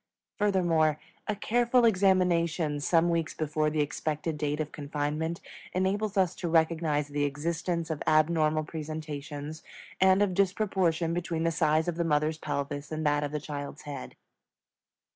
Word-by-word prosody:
Furthermore, 170 -7 +2 0.3
a 215 - 0
careful 240 +3 +2
examination 180 -6 +2
some 165 +3 +3
weeks 165 -1 -1
before 155 0 0
the 150 0 0
expected 155 +2 -3
date 150 0 -2
of 150 -1 -3
confinement 150 +3 -3 0.3
enables 195 +3 0
us 185 -3 +3
to 175 - -3
recognize 160 -3 +2
the 145 0 -1
existence 165 +3 -2
of 155 - -4
abnormal 155 0 +3
presentations 155 -1 -6 0.4
and 190 +1 +5
of 195 -3 0
disproportion 185 -4 +1
between 170 -1 -2
the 165 - +2
size 155 0 +2
of 170 -1 -2
the 170 - +1
mother's 155 0 +1
pelvis 145 0 -4
and 155 0 -3
that 145 0 +2
of 145 - -3
the 150 - -2
child's 145 0 -6
head. 145 -1 -7
160 Hz, 145 wpm, -29 LUFS, 150-175 Hz, 0.4 s, and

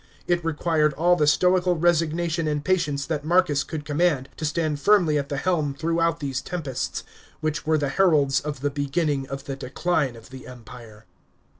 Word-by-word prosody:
It 175 -1 0
required 155 -1 +1
all 175 +3 +3
the 150 -4 +1
stoical 180 +3 +3
resignation 165 0 +1
and 150 -1 -2
patience 145 -7 0
that 150 -1 -3
Marcus 155 -4 +2
could 150 -1 -6
command, 150 -3 +1
to 155 - -3
stand 155 -1 -1
firmly 170 -5 +3
at 140 0 -5
the 140 - -3
helm 155 -3 0
throughout 165 +1 0
these 140 -4 -3
tempests, 145 -8 -4 0.4
which 155 -1 -3
were 160 0 +3
the 145 -2 -1
heralds 145 -5 +3
of 145 -3 -6
the 145 0 0
beginning 145 0 -1
of 135 +1 -6
the 135 - -5
Decline 135 0 -1
of 115 +2 -14
the 130 -1 -10
Empire. 115 -3 -12
150 Hz, 175 wpm, -24 LUFS, 140-170 Hz, 0.4 s, all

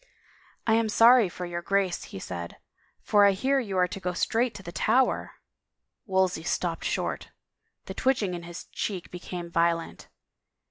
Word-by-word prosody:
" - - -30 0.2
I 220 - +3
am 225 -1 +2
sorry 230 -1 +6
for 180 +1 -6
your 175 0 -4
Grace," 195 -1 0
he - - -9
said, 85 -2 -6 0.2
" - - -39
for 205 -1 +6
I 200 -1 +6
hear 270 +8 +1
you 200 -7 -3
are 180 0 +4
to 195 - -7
go 180 -1 -2
straight 230 +6 0
to 195 - -9
the 170 - -7
Tower 255 +8 +1
I - - -26 0.4
" - - -57
Wolsey 190 -3 +1
stopped 165 0 -2
short. - - -2 0.6
The - - -6
twitching 235 -8 +1
in 175 - -5
his 170 0 -9
cheek 185 -5 -5
be 180 - -7
came 175 -1 -7
violent. 170 0 0
185 Hz, 190 wpm, -27 LUFS, 175-220 Hz, 0.6 s, sorry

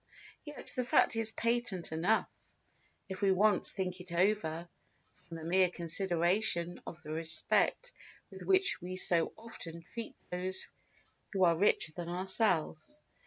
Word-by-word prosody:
Yet 295 -1 -4
the 255 - 0
fact 240 - +3
is 225 -1 +2
patent 230 -8 -1
enough, 175 +8 +1 0.8
if 190 -1 -7
we 195 -1 +3
once 205 +3 +3
think 185 -2 -4
it 180 -1 -13
over, 175 -2 0 0.5
from 165 -1 -10
the 160 - -9
mere 185 +2 +3
consideration 175 +1 +1
of 165 - -7
the 155 - -8
respect 160 - +1 0.4
with - - -11
which 385 - +3
we 180 +1 -6
so 170 -2 +2
often 170 -7 -9
treat 230 -1 -6 0.2
those 185 +1 -2 0.7
who 190 -1 +1
are 170 -2 +5
richer 165 -3 +2
than 170 -1 -6
ourselves. 185 - 0
185 Hz, 140 wpm, -32 LUFS, 170-215 Hz, 0.8 s, are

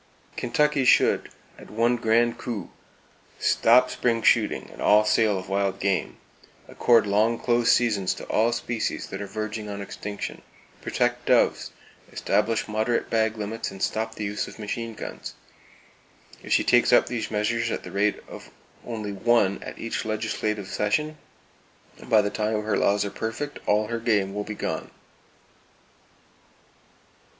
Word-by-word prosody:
Kentucky 150 -2 +1
should 125 - +4 0.3
at - - -13
one 115 +3 +2
grand 115 0 +2
coup 110 -7 -5 0.7
stop 125 +2 +4
spring 115 -2 0
shooting - - +2
and - - -11
all 105 +1 +5
sale 105 -2 +3
of 95 - -7
wild 100 0 -1
game, 95 -1 -1 0.5
accord 115 -3 +3
long 110 +3 +2
close 120 -1 +2
seasons 105 -6 +2
to - - -9
all 115 +2 +2
species 115 -1 -2
that 95 - -7
are 100 - -5
verging 110 +1 -5
on 100 0 -5
extinction, 100 +1 -6 0.4
protect - - -1
doves, - - +3 0.4
establish 115 0 0
moderate 110 +2 -1
bag 110 -1 +1
limits 110 +2 -4
and 95 0 -7
stop 110 0 -1
the 105 - -5
use 105 0 -3
of - - -11
machine 115 +1 -5
guns. - - -7 1.1
If - - -10
she - - +4
takes - - +4
up - - +6
these 120 -2 -4
measures 115 +2 0
at - - -3
the - - -9
rate 105 +1 0
of - - -11 0.3
only 110 -3 -5
one 100 -1 +2
at - - -8
each 115 - -3
legislative 110 -2 -2
session, 150 +12 -1 0.9
by 110 -3 +5
the 100 - -2
time 105 0 -1
her 110 0 0
laws 105 0 +2
are 100 - -4
perfect 115 +8 -5
all 105 +1 +3
her 115 +2 -3
game 105 -4 +1
will 105 0 -3
be 105 - -6
gone! - - -4
110 Hz, 150 wpm, -25 LUFS, 105-115 Hz, 1.1 s, up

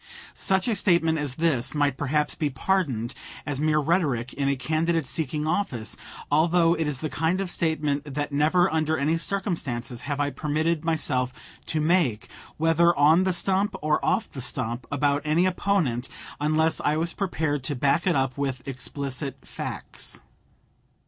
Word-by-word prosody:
Such 190 +1 +1
a 230 - +2
statement 170 -4 +2
as 145 -3 -2
this 145 -5 +1
might 145 -2 +2
perhaps 150 +2 0
be 150 -3 -1
pardoned 135 - 0 0.3
as 145 -1 -3
mere 155 0 +2
rhetoric 145 -6 +1
in 140 0 0
a 140 - +2
candidate 160 +4 0
seeking 150 +2 -1
office 130 - -1 0.4
although 165 +2 +4
it 160 -2 -1
is 140 -3 -1
the 155 - -1
kind 165 +4 0
of 195 -2 -2
statement 150 -3 -1
that 145 0 -2
never 160 +5 +3
under 160 0 +1
any 155 +4 +1
circumstances 145 - -2
have 145 0 -1
I 145 0 +1
permitted 155 +2 -1
myself 145 -6 0 0.4
to 155 - 0
make, 155 - +1 0.3
whether 165 +2 +4
on 155 +6 +5
the 185 - +2
stump 195 +3 +1
or 150 0 +1
off 220 - +1
the 135 - -7
stump, 120 -1 -3
about 145 0 +1
any 155 +4 +2
opponent, 175 -10 0 0.3
unless 155 +2 +2
I 150 +1 +1
was 165 +1 -1
prepared 155 -8 -1
to 145 - -1
back 145 +8 +1
it 175 - +3
up 135 0 0
with 130 -2 -3
explicit 135 0 -4
facts. - - -6
150 Hz, 160 wpm, -25 LUFS, 140-165 Hz, 0.4 s, on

